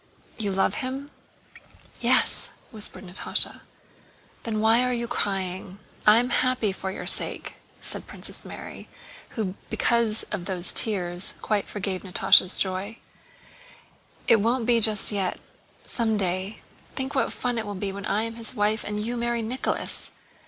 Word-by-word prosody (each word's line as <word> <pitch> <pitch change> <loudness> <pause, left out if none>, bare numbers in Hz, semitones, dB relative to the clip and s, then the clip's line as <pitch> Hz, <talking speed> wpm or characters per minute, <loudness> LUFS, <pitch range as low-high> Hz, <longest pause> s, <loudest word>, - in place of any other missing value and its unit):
"You 205 -3 0
love 190 0 +2
him?" 270 +2 -5 0.9
"Yes," - - +2 0.2
whispered 215 -2 -6
Natásha. 180 +2 -1 0.8
"Then 220 -2 -2
why 225 +2 +4
are 250 - +1
you 235 -1 -1
crying? 190 -2 -3 0.3
I 210 +1 +9
am 245 +1 +1
happy 255 -5 +2
for 190 0 -5
your 190 - -6
sake," - - +1 0.2
said - - -2
Princess - - -4
Mary, - - -9 0.5
who 200 -5 -1 0.2
because 235 -2 +2
of 175 - -3
those 185 -2 +2
tears 180 -4 0
quite 210 -2 0
forgave 195 -2 -3
Natásha's 185 0 +5
joy. 195 +4 -1 1.3
"It 230 - +7
won't 235 +2 +1
be 235 -1 +4
just 215 -2 +5
yet—someday. 200 0 -3 0.3
Think 265 +1 -3
what 270 - +1
fun 245 -2 -2
it 220 - -4
will 205 - -4
be 195 +1 -3
when 200 +1 -6
I 210 +2 +1
am 230 0 -5
his 230 +2 +2
wife 215 0 +1
and 210 0 -3
you 240 +2 -2
marry 235 -1 -1
Nicholas!" 250 +4 -2
215 Hz, 145 wpm, -26 LUFS, 195-235 Hz, 1.3 s, I